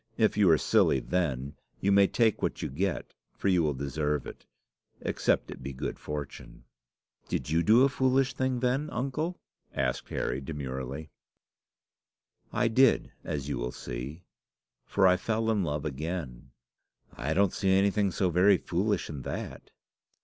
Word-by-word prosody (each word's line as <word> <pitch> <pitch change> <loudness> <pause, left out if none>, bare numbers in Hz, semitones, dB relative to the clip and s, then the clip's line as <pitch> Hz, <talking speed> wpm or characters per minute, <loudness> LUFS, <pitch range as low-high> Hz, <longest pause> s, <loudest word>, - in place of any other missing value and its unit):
If 110 -2 +3
you 100 -4 +5
are 80 - +6
silly 65 - +3
then, 70 -4 -1 0.3
you 100 - +1
may 100 0 +6
take 115 0 +2
what - - -2
you - - -2
get, 90 +6 -2 0.2
for 100 - 0
you 90 -2 +4
will 75 -3 0
deserve 75 +2 -2
it - - -10 0.5
except - - 0
it - - -9
be 70 +1 -5
good 70 +2 -4
fortune." 75 -4 -7 0.6
"Did - - -3
you 80 +1 +3
do 110 +7 +6
a - - +6
foolish 130 -1 +2
thing 130 -2 -1
then, 130 +4 0
uncle?" 150 +8 -2 0.4
asked - - -1
Harry, 65 +2 -2
demurely. 70 0 -5 1.4
"I 125 - +1
did, 130 +3 +4
as 70 -2 -4
you 70 -4 -2
will - - -2
see; 65 +10 -7 0.6
for 100 - +2
I 90 0 +6
fell 110 +2 0
in 105 -3 +1
love 75 -2 -2
again." 75 -3 -5 0.7
"I 75 +5 -2
don't 100 -1 +3
see 95 - 0
anything 100 +1 +3
so 90 0 0
very 95 +3 +5
foolish 100 +5 -1
in 75 -3 -6
that." - - -6
90 Hz, 155 wpm, -29 LUFS, 70-105 Hz, 1.4 s, are